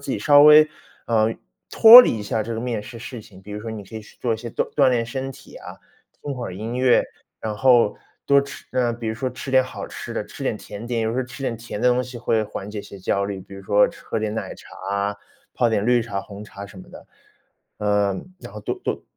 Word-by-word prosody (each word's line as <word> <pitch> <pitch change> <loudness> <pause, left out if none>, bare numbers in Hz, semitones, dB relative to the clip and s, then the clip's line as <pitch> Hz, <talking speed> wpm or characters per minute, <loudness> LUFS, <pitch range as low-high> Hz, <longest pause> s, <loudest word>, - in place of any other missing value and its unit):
自 140 - -6
己 - - -1
稍 145 -1 +6
微， 150 +1 +8 0.4
呃 115 -1 +2 0.4
脱 230 +2 +11
离 115 - +1
一 - - -6
下 110 +2 -2
这 115 +2 -5
个 110 - -4
面 115 -3 -3
试 120 +1 -10
事 115 +1 -8
情。 95 -2 -16
比 105 +2 -10
如 105 - -5
说 110 +1 -6
你 105 -2 -7
可 105 - -15
以 110 - -5
去 105 - -17
做 120 - 0
一 110 - -3
些 120 +1 -7
锻 - - -3
锻 140 -3 +4
炼 120 -2 +1
身 130 +2 -5
体 - - -14
啊， - - -10 0.5
听 145 -1 -4
会 125 -2 -5
儿 90 - -7
音 115 +4 -5
乐， 130 -1 +4 0.4
然 110 -1 -3
后 120 -2 +4 0.3
多 140 0 +5
吃 140 -1 -9
呃， 125 -2 +1
比 115 -1 -7
如 110 - -2
说 130 +3 -3
吃 135 - -8
点 130 0 +5
好 130 - -7
吃 - - -8
的， - - -2
吃 - - -11
点 - - -1
甜 110 +4 -9
点。 120 -2 -1
有 110 - 0
时 115 - -4
候 - - +1
吃 125 +2 -10
点 130 - -1
甜 115 -2 -7
的 125 - +2
东 125 +1 +2
西 125 0 -9
会 115 -2 +1
缓 105 -1 -7
解 105 -1 -5
些 100 - -12
焦 100 +1 -1
虑， 100 -1 -5
比 100 +1 -13
如 100 - -10
说 105 +1 +4
吃 - - -11
喝 - - -2
点 110 0 -3
奶 - - -5
茶 - - -16 0.2
啊， 100 0 -1 0.4
泡 120 - +2
点 105 -2 0
绿 120 0 +3
茶、 100 -3 -4
红 100 0 -10
茶 100 -1 -10
什 100 - -14
么 - - -15
的。 - - -13 0.7
呃 105 -2 +1 0.2
然 - - -10
后 105 - -8
多 - - -3
多 - - -2
115 Hz, 285 characters per minute, -22 LUFS, 105-125 Hz, 0.7 s, 脱